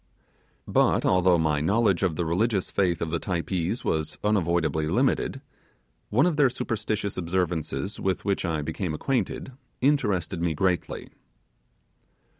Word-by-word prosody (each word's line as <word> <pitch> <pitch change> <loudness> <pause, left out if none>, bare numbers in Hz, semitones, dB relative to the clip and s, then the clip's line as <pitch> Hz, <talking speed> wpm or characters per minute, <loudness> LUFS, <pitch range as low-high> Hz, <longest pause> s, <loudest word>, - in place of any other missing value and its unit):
But, - - +2
although 90 -1 +4
my 75 -2 +1
knowledge 100 +2 +2
of 90 -5 +1
the 85 - -1
religious 95 +4 0
faith 90 -5 +1
of 80 - -4
the 85 - 0
Typees 90 +4 -2
was 80 -1 -1
unavoidably 85 -7 +1
limited, - - +1 0.7
one 120 +7 +3
of 175 -4 +1
their 140 -3 +5
superstitious 105 -3 -3
observances 90 -2 -2
with 95 0 -1
which 100 -1 0
I 80 -4 -1
became 80 +1 -3
acquainted 135 - -2 0.3
interested 100 - +1
me 85 -2 0
greatly. 90 +2 -1
90 Hz, 130 wpm, -26 LUFS, 80-105 Hz, 0.7 s, their